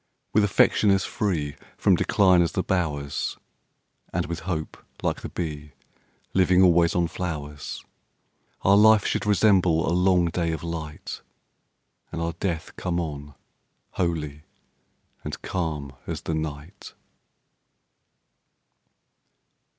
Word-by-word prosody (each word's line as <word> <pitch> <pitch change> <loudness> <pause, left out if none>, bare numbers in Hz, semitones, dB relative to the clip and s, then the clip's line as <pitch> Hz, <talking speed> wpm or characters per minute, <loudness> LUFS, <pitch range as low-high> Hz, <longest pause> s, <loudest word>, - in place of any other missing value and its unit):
With 105 - +4
affection 105 +1 +3
as 95 -1 +3
free 80 -9 -2 0.2
From - - +4
decline 90 -3 +4
as 85 -3 0
the - - 0
bowers, 75 -6 -2 0.7
And, - - -1
with 85 0 -4
hope, 80 -3 -3 0.3
like - - -1
the - - -6
bee, 75 -4 -5 0.6
Living 95 0 +4
always 85 -2 +4
on 85 -1 +2
flowers, 75 -4 -5 0.8
Our 100 - +6
life 110 0 +6
should - - -1
resemble 95 -5 +4
a 80 - +1
long 90 0 +3
day 85 -1 -1
of 80 - -5
light, 80 -3 -6 0.9
And - - -4
our 85 0 -2
death 85 -5 -3
come 90 -1 -1
on, 75 -3 -5 0.6
holy 75 -5 -2 0.8
and - - -5
calm 80 -6 -3 0.2
as - - -4
the 80 - -2
night. 80 +4 -6
85 Hz, 120 wpm, -25 LUFS, 75-95 Hz, 0.9 s, Our